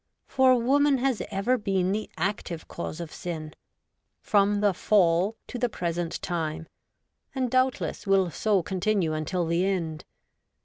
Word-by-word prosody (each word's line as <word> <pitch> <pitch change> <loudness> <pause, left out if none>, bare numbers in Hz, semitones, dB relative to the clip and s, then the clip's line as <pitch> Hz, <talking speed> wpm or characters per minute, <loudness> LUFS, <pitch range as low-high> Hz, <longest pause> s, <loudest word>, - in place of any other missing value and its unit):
For 260 -2 +4
woman 280 +3 +3
has 260 -2 0
ever 215 +5 0
been 190 -3 0
the 215 +2 -2
active 175 -2 -3
cause 170 -1 -6
of 170 -3 -7
sin, 155 -3 -6 0.7
from 205 -1 +2
the 205 -1 +3
Fall 185 +1 +2
to 245 - -6
the 245 0 +1
present 170 -3 -3
time, 165 -2 -3 0.7
and 255 -2 -1
doubtless 255 -4 0
will 190 -3 +3
so 200 +1 +1
continue 185 -2 0
until 170 +3 -1
the 170 +2 +1
end. 170 -6 -2
195 Hz, 140 wpm, -27 LUFS, 170-220 Hz, 0.7 s, For